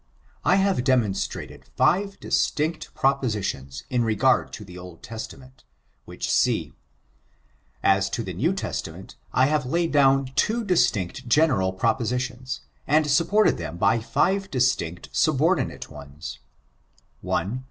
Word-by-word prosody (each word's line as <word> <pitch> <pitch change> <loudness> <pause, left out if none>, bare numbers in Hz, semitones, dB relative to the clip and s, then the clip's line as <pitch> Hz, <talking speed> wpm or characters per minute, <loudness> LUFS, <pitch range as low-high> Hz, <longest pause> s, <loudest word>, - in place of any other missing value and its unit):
I 180 - +4
have 195 -8 +2
demonstrated 120 -7 -1
five 195 +3 +2
distinct 155 +2 -1
propositions 105 - -1
in 125 -2 +1
regard 115 +4 +2
to 105 - -8
the 90 -2 -12
Old 90 -2 -11
Testament, 130 +4 -9 0.4
which - - -5
see. - - +1 1.1
As 95 0 +3
to 105 +4 -3
the 95 -3 -5
New 135 - +1
Testament, 95 - -5 0.2
I 130 - +4
have 150 0 +1
laid 170 +4 0
down 135 -2 +4
two 230 +2 +1
distinct 120 - 0
general 125 -10 +3
propositions, 125 +6 -2 0.3
and 155 +2 +4
supported 170 +9 +3
them 85 - -5
by 115 +6 +3
five 190 - 0
distinct 120 - 0
subordinate 155 +1 +1
ones: 75 +1 -9 0.4
— 65 -1 -14
I. 105 +9 0
125 Hz, 125 wpm, -24 LUFS, 95-155 Hz, 1.1 s, I